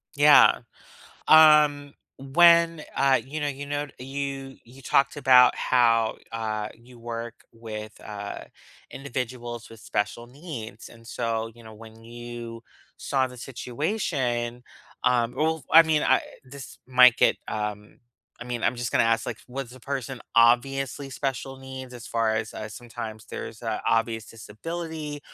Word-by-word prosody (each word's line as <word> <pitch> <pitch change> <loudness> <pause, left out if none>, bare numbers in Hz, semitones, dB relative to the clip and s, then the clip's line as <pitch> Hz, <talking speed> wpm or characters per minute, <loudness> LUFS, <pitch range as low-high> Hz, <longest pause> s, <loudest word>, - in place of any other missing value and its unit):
Yeah. 145 +1 +7 0.7
Um, 150 -2 +6 0.2
when, 165 +3 +4
uh, 135 -1 +3
you 150 +4 -6
know 145 - -1
you 140 0 -6
know 145 0 -3
you 135 0 -5
you 125 +3 -16
talked 135 +2 +1
about 130 -3 +6
how, 115 -3 +2 0.2
uh, 110 -2 -3
you 120 +1 -18
work 115 0 -6 0.2
with, 110 -2 -9
uh, 100 -1 -7 0.5
individuals 120 -3 -6
with 115 -1 -14
special 105 +4 -3
needs 125 - -9
and, 115 -1 -17
so, 115 -1 -3
you 120 - -16
know, 110 -1 -12
when 110 +1 -14
you 120 0 -8 0.3
saw 135 -2 0
the 125 0 -11
situation, 125 - -3 0.4
um 120 -1 +2
well, 160 +1 0
I 165 - +9
mean, 160 -2 +1
I - - +3 0.2
this 135 0 -11
might 125 -1 +6
get, - - +3
um 105 -1 -5 0.4
I - - -6
mean, 120 -1 -4
I'm 125 - +1
just 120 0 -3
gonna - - +3
ask, 115 0 +1
like, - - -4
was 130 -1 -6
the 130 - -13
person 135 -1 -5
obviously 135 +4 +2
special 135 0 -4
needs 130 -1 -9
as 120 -1 -10
far 115 -1 0
as 110 0 -3
uh, 110 - -6
sometimes 110 -1 -8
there's 110 - -8
a 110 -2 -3
obvious 115 -1 +1
disability 150 +7 -7
125 Hz, 145 wpm, -25 LUFS, 115-140 Hz, 0.7 s, I